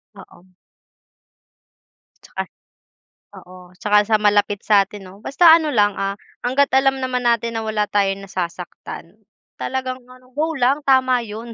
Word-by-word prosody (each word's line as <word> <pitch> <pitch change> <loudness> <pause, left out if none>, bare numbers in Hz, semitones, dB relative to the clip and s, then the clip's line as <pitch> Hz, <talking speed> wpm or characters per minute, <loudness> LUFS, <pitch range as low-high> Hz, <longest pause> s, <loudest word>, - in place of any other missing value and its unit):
Oo. 185 +1 -17 1.7
'Tsaka, - - -5 1.0
oo 180 0 -15
'tsaka 210 0 +2
sa 220 0 +3
malapit 205 -1 +2
sa'tin 205 -1 +1
'no 185 +2 -13
basta 330 +5 +5
ano 305 -4 -3
lang, 205 -2 +2
ah, 195 0 -1 0.3
hangga't 275 +3 +2
alam 270 0 +2
naman 250 -1 -2
natin 235 -1 +1
na 220 - -4
wala 210 -1 -1
tayong 195 -1 0
nasasaktan, 180 +1 -7 0.4
talagang 255 -1 -4
ano, 255 0 -18
go 320 +1 0
lang 270 +1 +1
tama 260 -2 +3
'yon. 225 +2 -8
220 Hz, 135 wpm, -20 LUFS, 200-255 Hz, 1.7 s, basta